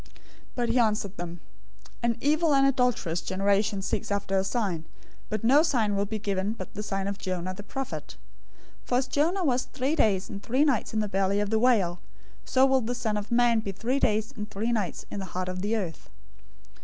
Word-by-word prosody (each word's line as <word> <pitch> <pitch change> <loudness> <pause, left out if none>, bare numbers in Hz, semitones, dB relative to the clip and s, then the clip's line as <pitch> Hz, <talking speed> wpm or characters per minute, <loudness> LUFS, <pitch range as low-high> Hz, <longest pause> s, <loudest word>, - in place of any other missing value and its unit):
012:039 - - -21 0.5
But 240 -2 0
he 240 +2 +3
answered 210 -4 +1
them, 175 0 -6 0.6
"An 235 -1 +1
evil 305 +1 +3
and 275 0 +5
adulterous 250 -11 +1
generation 195 +2 +1
seeks 205 - -2
after 200 -1 -1
a 190 - +3
sign, 195 -7 -1 0.4
but 215 0 -3
no 270 +6 +6
sign 225 -10 +1
will 200 +1 0
be 220 - -3
given 200 0 -1
it - - -15
but 185 - -8
the 210 - -4
sign 195 -2 -2
of 200 0 -4
Jonah 185 0 -3
the 195 - -8
prophet. 270 +5 -6 0.6
012:040 - - -28
For 245 - +2
as 260 - +1
Jonah 335 +8 +1
was 255 -5 +1
three 270 +4 -1
days 200 - +2
and 200 - -7
three 260 +7 +2
nights 255 -6 0
in 215 - +2
the 210 - -1
belly 195 0 +1
of 205 0 -1
the 220 - +3
whale, 205 -8 +3 0.5
so 260 0 +4
will 265 -1 +3
the 245 +2 -2
Son 225 -3 -1
of 210 0 -3
Man 235 -1 +4
be 205 -2 -3
three 235 +8 -1
days 215 -2 +1
and 210 -1 -6
three 220 +4 -2
nights 210 -6 -2
in 205 - -4
the 190 - -4
heart 185 0 -1
of 185 0 -4
the 210 +3 0
earth. 180 -8 -4
215 Hz, 220 wpm, -27 LUFS, 195-245 Hz, 0.6 s, no